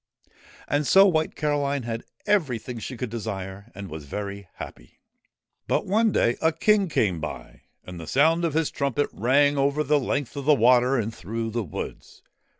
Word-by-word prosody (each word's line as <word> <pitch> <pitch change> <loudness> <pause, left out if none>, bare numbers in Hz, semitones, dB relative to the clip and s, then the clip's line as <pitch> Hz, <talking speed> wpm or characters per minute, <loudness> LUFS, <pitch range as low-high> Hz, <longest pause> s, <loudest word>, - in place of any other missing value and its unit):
And 145 0 0
so 195 +1 +7
White 160 -5 +1
Caroline 145 -3 0
had 115 0 -4 0.2
everything 130 - 0
she 125 +3 -6
could 120 -1 -4
desire, 100 -2 -5
and 100 0 -7
was 80 -3 -8
very 100 +4 -6
happy. - - -11 0.7
But - - +1
one 220 +3 +2
day 120 - +2
a 160 - +3
King 200 +3 +2
came 95 - +1
by, 75 -1 -7 0.2
and 90 -1 -9
the 80 - -8
sound 160 +5 +3
of 160 -3 0
his 160 -1 +1
trumpet 140 +1 -1
rang 140 +5 +3
over 140 +2 +2
the 150 +1 +3
length 140 0 -2
of 140 -1 -5
the 150 0 +6
water 125 +2 +4
and 115 -1 -2
through 115 +4 -4
the 120 +1 -1
woods. 90 -9 -7
130 Hz, 175 wpm, -25 LUFS, 110-150 Hz, 0.7 s, so